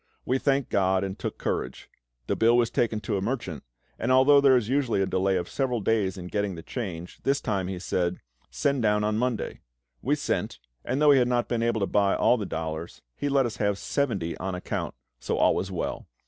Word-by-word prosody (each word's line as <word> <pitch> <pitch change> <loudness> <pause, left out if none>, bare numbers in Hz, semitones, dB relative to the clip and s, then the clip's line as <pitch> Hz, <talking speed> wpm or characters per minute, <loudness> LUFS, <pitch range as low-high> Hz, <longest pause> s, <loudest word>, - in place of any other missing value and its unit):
We 130 +1 +1
thanked 135 -2 +1
GOD 95 -1 +2
and 95 +1 -4
took - - -4
courage. 65 - -3 0.4
The - - 0
bill 115 +1 +4
was 120 -1 +2
taken 115 -3 0
to 105 -3 -1
a - - -2
merchant, 100 - -3 0.4
and 120 - 0
although 135 +2 +6
there 135 -2 +6
is 115 -4 -1
usually 130 -5 +1
a 95 - +2
delay 95 0 +1
of 90 -1 -3
several 130 -3 -1
days 100 -3 0
in 90 - -7
getting 100 0 -2
the 80 - -9
change, 90 -8 -6
this 140 +1 +1
time 100 -5 -1
he 95 -1 -4
said, 90 0 -1 0.3
"Send 140 -2 0
down 105 -1 +2
on 105 +1 0
Monday." 125 -1 -2 0.4
We - - +1
sent, - - -2 0.3
and 130 +3 -1
though 150 -1 +6
he 140 - +6
had 125 - +3
not 120 -1 +1
been 120 -2 -1
able 115 -2 +1
to - - +3
buy 100 0 +2
all 125 - +3
the 105 -4 -4
dollars, 80 +1 -5
he 145 - -2
let 135 -1 +3
us 115 0 -4
have 100 -2 +1
seventy 100 - -1
on 95 +1 -3
account; 90 - -4 0.2
so - - -2
all - - +4
was 95 - -2
well. 90 -3 -4
105 Hz, 220 wpm, -26 LUFS, 95-125 Hz, 0.4 s, although